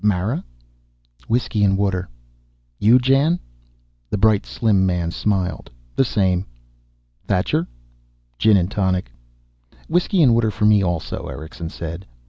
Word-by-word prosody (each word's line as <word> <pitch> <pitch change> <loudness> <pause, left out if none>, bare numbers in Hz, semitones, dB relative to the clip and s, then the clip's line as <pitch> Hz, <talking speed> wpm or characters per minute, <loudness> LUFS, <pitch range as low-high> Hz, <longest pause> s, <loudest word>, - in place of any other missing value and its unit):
Mara?" 105 +1 0 0.8
"Whiskey 115 -3 0
and 95 -1 +3
water." 95 -2 -1 0.7
"You, 115 +4 +6
Jan?" 135 +7 +2 0.7
The - - -1
bright 105 0 +3
slim 105 -5 +1
man 90 -3 0
smiled. 95 -2 -2 0.3
"The - - +4
same." 95 -6 0 0.8
"Thacher?" - - 0 0.7
"Gin 110 -2 +5
and 90 +1 0
tonic." 95 -10 -1 0.8
"Whiskey 175 +1 +2
and 125 -5 +5
water 115 -1 +2
for 105 0 -1
me, 105 -1 +5
also," 85 -3 -3
Erickson 80 +1 -7
said. 85 +3 -7
100 Hz, 120 wpm, -21 LUFS, 90-115 Hz, 0.8 s, You